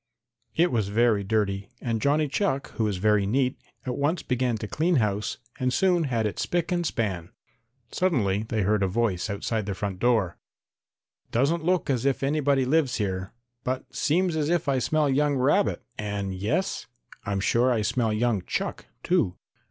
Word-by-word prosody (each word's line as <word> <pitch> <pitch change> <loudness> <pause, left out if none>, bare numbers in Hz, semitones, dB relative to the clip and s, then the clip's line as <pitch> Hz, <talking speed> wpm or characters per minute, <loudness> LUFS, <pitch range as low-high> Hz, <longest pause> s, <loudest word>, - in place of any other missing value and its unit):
It 175 +2 +3
was 110 -5 +1
very 110 0 +2
dirty, 100 -1 -1
and 115 -3 -2
Johnny 150 +2 +2
Chuck, 140 -2 -1
who 110 -2 -1
is 100 -3 -1
very 105 +1 +2
neat, 130 +4 +1 0.3
at 125 - -2
once 150 +5 0
began 125 -2 0
to 105 - -5
clean 165 - +1
house 105 -5 0 0.2
and 130 0 +1
soon 175 +1 +2
had 115 -5 0
it 105 -4 -3
spick 175 0 -1
and 175 -1 +1
span. 95 - -2 0.6
Suddenly 110 - +1
they 110 -3 0
heard 105 +1 +2
a 95 - +3
voice 105 -1 0
outside 105 +1 -2
the 100 - -2
front 95 -1 -4
door. 110 -7 +1 0.9
"Doesn't 145 +8 +1
look 180 +1 +1
as 125 -3 0
if 140 0 +1
anybody 140 -2 +2
lives 140 -2 +2
here, 95 -2 -2 0.3
but 130 +1 -3
seems 170 +3 +1
as 150 -1 0
if 170 -2 +1
I 135 -2 +2
smell 155 +4 +1
young 145 +1 +2
rabbit 140 +10 +2 0.2
and 100 -2 -3
yes, 105 - -1 0.4
I'm 100 -1 -1
sure 120 +6 +2
I 110 -3 +1
smell 115 +1 +1
young 110 -2 +1
chuck, - - -3 0.2
too. 90 - +1
120 Hz, 175 wpm, -26 LUFS, 105-145 Hz, 0.9 s, It